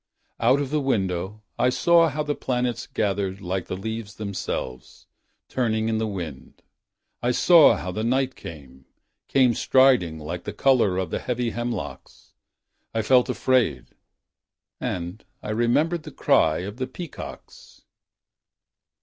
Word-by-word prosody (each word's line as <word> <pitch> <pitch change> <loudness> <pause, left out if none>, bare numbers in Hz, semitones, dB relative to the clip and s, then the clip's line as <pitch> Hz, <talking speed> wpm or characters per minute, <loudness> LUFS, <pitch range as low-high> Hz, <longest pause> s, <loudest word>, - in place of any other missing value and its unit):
Out 125 +4 +4
of 140 -1 -3
the 150 -1 +1
window, 100 -4 -1 0.2
I 125 - +4
saw 170 +5 +4
how 150 +1 -2
the 150 0 -1
planets 125 -4 -2
gathered 100 -2 -1
Like 95 -1 -3
the 90 - -4
leaves 110 0 -5
themselves 90 -11 -5 0.4
Turning 110 -3 0
in 110 -1 0
the 110 - -1
wind, 85 -10 -7 0.6
I 120 - +1
saw 160 +5 +6
how 90 - -5
the 110 +4 -3
night 130 +2 +1
came. 65 -5 -11 0.4
Came 130 -3 +4
striding 125 -10 +3
like 85 +3 -6
the - - -5
color 120 -9 +3
of 95 -3 -2
the - - -1
heavy 125 -1 -2
hemlocks. 120 +1 -6 0.6
I 110 - +1
felt 125 +3 +4
afraid 130 -2 +1 0.5
— - - -65
And 90 +4 -4 0.2
I 105 - -4
remembered 145 +10 +1
the 150 0 -10
cry 80 - +2
of 100 +4 -6
the 130 0 -2
peacocks 165 +5 -10
115 Hz, 140 wpm, -24 LUFS, 95-130 Hz, 0.6 s, saw